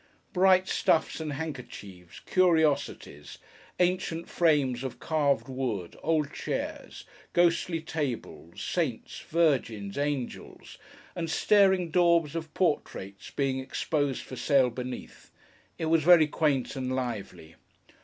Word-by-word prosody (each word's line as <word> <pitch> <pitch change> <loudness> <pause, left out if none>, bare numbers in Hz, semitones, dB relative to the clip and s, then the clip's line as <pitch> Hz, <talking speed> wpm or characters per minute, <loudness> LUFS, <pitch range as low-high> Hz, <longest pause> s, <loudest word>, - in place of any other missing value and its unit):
Bright 185 0 +4
stuffs 160 - +1
and 155 -2 -4
handkerchiefs, 120 - -8
curiosities, 155 - +1 0.4
ancient 175 -2 0
frames 140 -7 +2
of 130 - -5
carved 145 -4 +1
wood, 125 -9 -3
old 155 -2 0
chairs, - - -5 0.3
ghostly 170 -1 +2
tables, 135 - -5
saints, 150 -11 -2
virgins, 130 -11 0
angels, 145 -3 -4 0.4
and 165 -2 -3
staring 190 -2 +3
daubs 170 -3 +3
of 160 -2 -5
portraits, 100 - -2
being 135 -2 -1
exposed 140 +1 -2
for 130 - -9
sale 130 -2 +3
beneath, 125 +1 -8 0.5
it 160 - -3
was 160 0 +3
very 170 0 +7
quaint 145 -4 0
and 130 -1 -2
lively. 105 -10 -5
145 Hz, 110 wpm, -28 LUFS, 125-165 Hz, 0.5 s, very